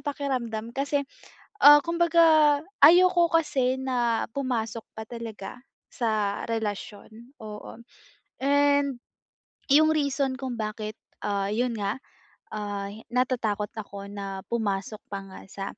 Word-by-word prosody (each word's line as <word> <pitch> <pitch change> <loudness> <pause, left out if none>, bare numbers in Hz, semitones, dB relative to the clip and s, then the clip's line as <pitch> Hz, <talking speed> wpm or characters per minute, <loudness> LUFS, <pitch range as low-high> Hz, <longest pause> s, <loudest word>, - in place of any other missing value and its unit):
pakiramdam. 250 -6 -3
Kasi, 280 +2 -1 0.6
ah, 295 -3 +9
kumbaga 330 -3 +4 0.2
ayoko 350 +2 +7
kasi 295 -6 +1
na 245 -3 0
pumasok 230 -5 -3
pa 220 - -6
talaga 225 -2 -8 0.3
sa 215 -4 -1
relasyon. 220 +3 -5
Oo. 215 +2 -9 0.6
And 285 -2 +2 0.7
yung 310 +2 +6
reason 280 -3 0
kung 255 -3 -4
bakit, 215 0 -4 0.3
ah, 200 -1 -1
yun 240 +2 0
nga, 200 0 -1 0.6
ah, 205 -2 -4
hi 215 +2 -11
natatakot 235 -5 0
ako 200 -2 -7
na 195 -1 -6
pumasok 210 -2 -2
pa 195 - -3
nga 190 -1 -11
sa, 195 - -6
235 Hz, 115 wpm, -26 LUFS, 210-280 Hz, 0.7 s, ah